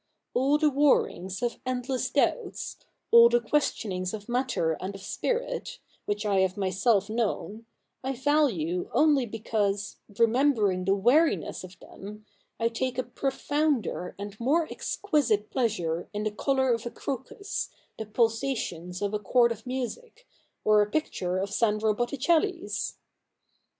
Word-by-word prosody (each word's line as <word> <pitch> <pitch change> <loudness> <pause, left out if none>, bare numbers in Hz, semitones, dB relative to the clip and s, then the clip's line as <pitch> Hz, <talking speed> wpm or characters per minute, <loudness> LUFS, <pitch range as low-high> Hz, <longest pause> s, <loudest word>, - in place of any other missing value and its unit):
All 275 +4 +3
the 300 -1 +3
warrings 245 -9 +1
of 240 - -1
endless 255 0 -2
doubts, - - -1 0.3
all 235 0 +9
the 240 0 +3
questionings 215 -7 -1
of 205 -1 -10
matter 245 -9 0
and 195 +2 -4
of 195 - -9
spirit, - - -2 0.3
which 205 +1 -2
I 200 -2 +2
have 190 0 +1
myself 195 +2 +2
known, 220 0 -2 0.4
I 265 +1 -1
value 245 - +1
only 290 -5 +4
because, 205 -2 -2 0.2
remembering 230 -6 +3
the 195 +1 +3
weariness 255 - +2
of 185 -1 -11
them, 210 +4 -11 0.3
I 230 - +2
take 250 +2 -2
a 255 - +1
profounder 270 - -1
and 205 +1 -7
more 305 +7 +2
exquisite 285 - 0
pleasure 175 -10 -1
in 210 0 -2
the 215 - -1
colour 265 +3 +1
of 230 0 -3
a - - -2
crocus, 275 - -4 0.3
the 220 - -5
pulsations 215 -6 -1
of 200 +1 -1
a 210 - 0
chord 235 +4 +3
of 225 +1 -6
music, 355 - -5 0.4
or 215 -1 +6
a 205 - +1
picture 185 - -1
of 195 +1 -2
Sandro 215 -1 +2
Botticelli's.' 325 - 0
230 Hz, 140 wpm, -27 LUFS, 205-270 Hz, 0.4 s, all